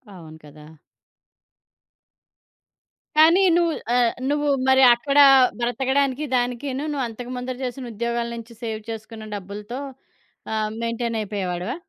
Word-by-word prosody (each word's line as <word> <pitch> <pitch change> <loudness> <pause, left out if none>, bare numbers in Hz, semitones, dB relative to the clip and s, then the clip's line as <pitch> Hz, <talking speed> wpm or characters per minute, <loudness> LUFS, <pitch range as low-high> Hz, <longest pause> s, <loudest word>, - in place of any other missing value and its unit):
అవును 160 -3 -12
కదా! 150 +1 -14 2.5
కానీ 330 +5 +6
నువ్వు 340 -1 +2 0.2
ఆహ్, 240 -2 +3 0.2
నువ్వు 295 0 0 0.2
మరి 265 0 +5
అక్కడ 275 +4 +1 0.4
బ్రతకడానికి, 265 +3 0
దానికీను 250 +3 -2
నువ్వు 275 -3 -2
అంతకుముందు 250 +2 -6
చేసిన 250 0 -5
ఉద్యోగాల 235 +2 -2
నుంచి 230 0 -10
సేవ్ 220 -1 -4
చేసుకున్న 220 0 -8
డబ్బులతో, 205 +5 -7 0.7
ఆహ్, 215 -1 -1
మెయింటైన్ 230 0 -2
అయిపోయేవాడివా? 190 -1 -3
240 Hz, 105 wpm, -23 LUFS, 215-265 Hz, 2.5 s, కానీ